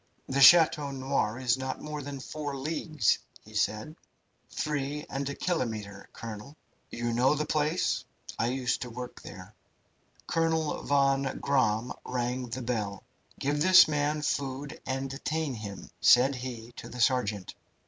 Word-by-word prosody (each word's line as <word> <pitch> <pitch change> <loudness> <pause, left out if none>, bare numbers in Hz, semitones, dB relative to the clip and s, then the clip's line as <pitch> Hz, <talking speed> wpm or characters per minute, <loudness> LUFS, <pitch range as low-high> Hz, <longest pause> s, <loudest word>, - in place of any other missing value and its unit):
"The 135 +1 0
Chateau 155 -1 +7
Noir 130 -4 -1
is 130 -1 +1
not 130 0 -3
more 150 -1 -5
than 140 0 -6
four 145 +3 -5
leagues," 155 +2 0 0.3
he 110 - -14
said. 110 +7 -1 0.5
"Three 150 0 -3
and 135 +1 -2
a 140 - -4
kilometre, 110 - -3
colonel." 115 +6 -8 0.3
"You 120 0 -2
know 125 +5 +3
the 150 +1 -1
place?" 155 +3 0 0.4
"I 115 - +2
used 125 0 -1
to 125 - -4
work 125 +1 -8
there." 95 +1 -11 0.7
Colonel 160 -2 0
von 135 -1 +2
Gramm 120 -4 +1
rang 125 0 -2
the 120 +2 -5
bell. 105 -5 -3 0.4
"Give 145 +2 0
this 185 +2 +8
man 150 0 0
food 140 0 -3
and 135 +1 -2
detain 150 +2 -2
him," 105 -4 -8
said 130 +3 +6
he 120 -2 -6
to - - -8
the 125 - -9
sergeant. 110 -6 +1
135 Hz, 145 wpm, -29 LUFS, 120-150 Hz, 0.7 s, this